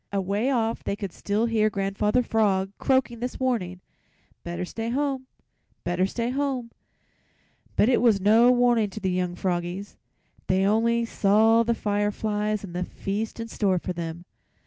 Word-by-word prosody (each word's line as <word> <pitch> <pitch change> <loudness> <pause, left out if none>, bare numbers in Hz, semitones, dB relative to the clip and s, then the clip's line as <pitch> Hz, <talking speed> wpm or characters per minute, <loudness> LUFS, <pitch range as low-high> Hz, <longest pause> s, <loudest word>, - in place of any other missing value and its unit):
Away 200 +5 0
off 230 -4 0
they - - -2
could 200 -3 -5
still 210 +3 -1
hear 220 -2 +2
Grandfather 200 +4 0
Frog 195 -4 +1
croaking 260 -3 +1
his 250 +1 -4
warning: 185 -9 -1 0.6
"Better 175 +1 -4
stay 225 +5 -4
home, 265 0 -1 0.6
better 175 +2 +1
stay 235 +4 -2
home." 265 -3 -2 1.0
But - - +4
it 250 - +3
was 225 -5 +4
no 220 +5 +5
warning 240 -3 +3
to 195 - -7
the 190 -3 -1
young 180 -1 -1
froggies; 180 +2 -3 0.5
they 190 +1 +2
only 230 +3 +2
saw 220 +1 +4
the 230 0 +1
fireflies 210 0 -1
and 185 -4 -8
the 180 - -1
feast 205 +5 -4
in 230 - -4
store 195 -4 0
for 180 +1 -3
them. 170 0 -6
210 Hz, 155 wpm, -25 LUFS, 190-235 Hz, 1.0 s, no